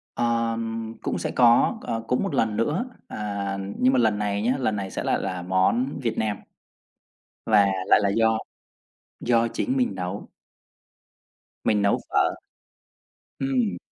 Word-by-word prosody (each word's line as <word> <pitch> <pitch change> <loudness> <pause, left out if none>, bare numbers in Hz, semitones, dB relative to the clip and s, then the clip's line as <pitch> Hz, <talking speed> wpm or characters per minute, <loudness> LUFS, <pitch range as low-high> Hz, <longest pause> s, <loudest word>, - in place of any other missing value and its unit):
Ờm, 115 -1 -1
cũng - - -2
sẽ - - -3
có, 120 - +4
ờ, 115 0 -3
cũng 125 - +1
một 195 - -2
lần 110 -2 +1
nữa, 150 - 0 0.2
à, 100 -2 -3 0.2
nhưng 130 +1 +4
mà 130 - +4
lần 110 -3 +2
này 100 -1 -1
nhá, 120 +4 +1
lần 120 -5 0
này 95 -2 -4
sẽ - - -4
lại - - +1
là 95 -2 -3
món 95 +10 +1
Việt 115 -3 -2
Nam. 105 -2 0 1.1
Và 105 -3 +5 0.2
lại - - +6
là 100 - +2
do 110 +2 +2 0.8
do 115 -1 +2
chính 260 - -2
mình 250 -2 +1
nấu. 90 +2 -5 1.4
Mình 105 -2 +2
nấu 100 - +2
phở. - - +2 1.0
Ừm. 125 -9 0
115 Hz, 150 wpm, -25 LUFS, 100-120 Hz, 1.4 s, lại